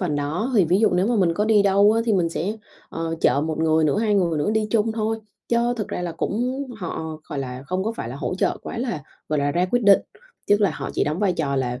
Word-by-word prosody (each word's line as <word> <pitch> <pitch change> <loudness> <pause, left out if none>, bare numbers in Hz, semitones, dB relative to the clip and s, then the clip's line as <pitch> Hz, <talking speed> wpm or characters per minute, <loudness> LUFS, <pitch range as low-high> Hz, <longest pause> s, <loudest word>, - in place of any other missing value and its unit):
phần 160 -6 -1
đó. 160 - -2
Thì 195 - +6
ví 180 +4 +2
dụ 225 - +4
nếu 180 +3 +2
mà 240 -1 +1
mình 175 -4 +2
có 210 - +1
đi 215 -2 +4
đâu 200 +2 +5
á, 225 - +2
thì 225 - +1
mình 175 -4 +2
sẽ, 195 +6 -3 0.3
ờ, 165 0 -3
chở 140 - +3
1 160 +1 -2
người 160 0 +3
nữa, 155 +7 +2
2 215 -2 +1
người 170 -5 +1
nữa 145 - 0
đi 220 0 +1
chung 225 -1 +2
thôi. 220 0 -1 0.3
Chớ 235 +1 +2
thực 215 - -3
ra 180 - -4
là 170 -1 -3
cũng 250 +10 -2
họ, 160 -5 -5
gọi 145 - -4
là, 130 -1 -5
không 185 +2 -2
có 225 - -1
phải 115 - -5
là 130 - -6
hỗ 170 - -3
trợ - - 0
quá 240 - -6
lá, 235 - -3 0.3
gọi 150 - 0
là, 145 0 +1
ra 175 +1 +2
quyết 245 0 +1
định. 200 -1 +7 0.5
Tức 205 +1 +3
là 200 - +3
họ 135 - -5
chỉ - - +1
đóng 155 +4 -2
vai 200 -3 +2
trò 145 -5 -1
là, 125 -1 -2
185 Hz, 280 wpm, -23 LUFS, 155-215 Hz, 0.5 s, định